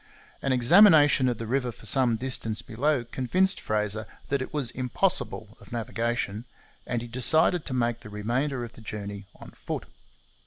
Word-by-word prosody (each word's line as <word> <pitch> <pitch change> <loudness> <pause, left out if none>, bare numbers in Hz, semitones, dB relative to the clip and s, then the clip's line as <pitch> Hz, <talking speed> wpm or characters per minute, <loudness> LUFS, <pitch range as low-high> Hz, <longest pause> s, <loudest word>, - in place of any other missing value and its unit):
An 135 - -1
examination 145 - +6
of 120 - -2
the 115 - -5
river 125 +1 -1
for - - -14
some 125 -4 +3
distance 115 -2 -1
below 135 +3 0
convinced 180 - +1
Fraser 105 0 -2 0.2
that 140 -1 0
it 130 - -5
was 145 -5 +1
impossible 125 - -1
of - - -16
navigation, 115 -1 -3 0.4
and 120 -2 -2
he - - -7
decided 155 +7 +2
to 130 - -4
make 120 -1 0
the 105 - -11
remainder 120 +6 -2
of 120 0 -8
the - - -14
journey 100 -2 -7
on - - -13
foot. - - -6
120 Hz, 165 wpm, -26 LUFS, 110-135 Hz, 0.4 s, examination